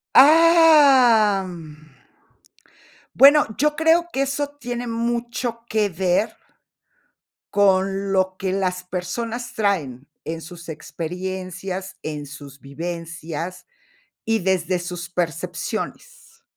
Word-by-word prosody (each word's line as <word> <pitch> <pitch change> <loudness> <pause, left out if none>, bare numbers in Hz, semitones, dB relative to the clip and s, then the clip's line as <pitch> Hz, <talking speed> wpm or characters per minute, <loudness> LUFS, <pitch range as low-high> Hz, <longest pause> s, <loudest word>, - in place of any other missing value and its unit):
Am, 280 - +6
mm, 155 -4 -11 1.2
bueno, 285 +2 +7
yo 300 +2 +1
creo 325 +2 +3
que 270 - +1
eso 275 +1 -2
tiene 245 -2 -5
mucho 235 0 -3
que 215 -2 +1
ver, 185 +5 0 1.2
con 195 0 +2
lo 185 -1 +1
que 190 -1 -2
las 185 -2 -1
personas 230 +7 -5
traen 150 - -1 0.2
en 165 0 -5
sus 170 +1 -11
experiencias, 185 +4 -6
en 150 -2 -5
sus 140 -1 -12
vivencias, 170 +3 -6 0.6
y 225 0 +1
desde 185 -1 0
sus 175 -1 -6
percepciones. 180 - -5
190 Hz, 100 wpm, -22 LUFS, 175-240 Hz, 1.2 s, bueno